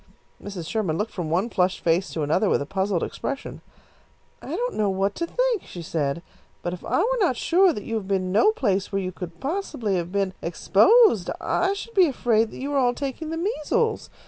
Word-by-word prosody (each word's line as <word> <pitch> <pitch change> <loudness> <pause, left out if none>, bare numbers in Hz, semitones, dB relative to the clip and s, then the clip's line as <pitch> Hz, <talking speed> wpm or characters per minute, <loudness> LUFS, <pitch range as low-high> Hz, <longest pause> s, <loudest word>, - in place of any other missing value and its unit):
Mrs. 190 -5 -6
Sherman 190 -8 -1
looked 215 +2 -2
from 175 -5 -4
one 180 +7 +1
flushed 185 -3 0
face 170 +3 +2
to 160 - -2
another 180 +8 +2
with - - +3
a 140 - -3
puzzled 190 +1 -1
expression. 275 -1 -5 0.8
"I 310 - -5
don't - - -2
know 210 -2 +1
what 195 +1 0
to 335 - -2
think," - - 0
she 175 - -8
said, 155 0 -2 0.4
"but 175 - -2
if 180 - -8
I - - 0
were 480 +8 +2
not 345 - +2
sure 365 +6 +4
that 210 - -5
you 225 - -6
have 200 -3 -5
been 185 -2 0
no 220 - +5
place 200 - -1
where 195 - 0
you 185 -1 -3
possibly 215 - -4
could 190 - +2
have 170 +1 -5
been 195 -1 0
exposed, 215 - +4
I 375 +3 +1
should 445 +3 -7
be 375 -5 +5
afraid 230 -5 +1
that - - -11
you 280 +2 -3
are 280 - +3
all 245 -2 +2
taking 285 +3 -4
the 325 - -3
measles. 430 +5 -1
210 Hz, 215 wpm, -24 LUFS, -, 0.8 s, no